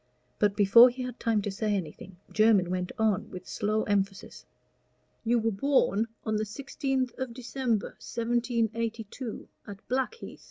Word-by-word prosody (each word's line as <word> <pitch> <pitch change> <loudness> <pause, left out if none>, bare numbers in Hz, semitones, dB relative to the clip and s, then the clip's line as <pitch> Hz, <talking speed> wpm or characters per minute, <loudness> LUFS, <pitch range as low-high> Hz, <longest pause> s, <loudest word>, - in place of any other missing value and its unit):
But 205 -1 +2
before 210 +5 +8
he 255 +1 -6
had 250 -1 -6
time 225 -3 +1
to 205 - -2
say 210 +1 -1
anything, 180 +1 -6
Jermyn 215 -5 +4
went 180 -1 -2
on 220 -4 +1
with 185 -1 -9
slow 215 +1 0
emphasis. 195 -1 -2 0.8
"You 235 +1 +2
were 225 0 +1
born 225 -1 +2 0.2
on 220 -1 0
the 215 - -1
sixteenth 265 +2 -2
of 255 -3 -4
December, 245 -3 -1
1782, 230 -1 -2 0.2
at 200 -1 -10
Blackheath. 265 - -3
220 Hz, 145 wpm, -28 LUFS, 205-245 Hz, 0.8 s, before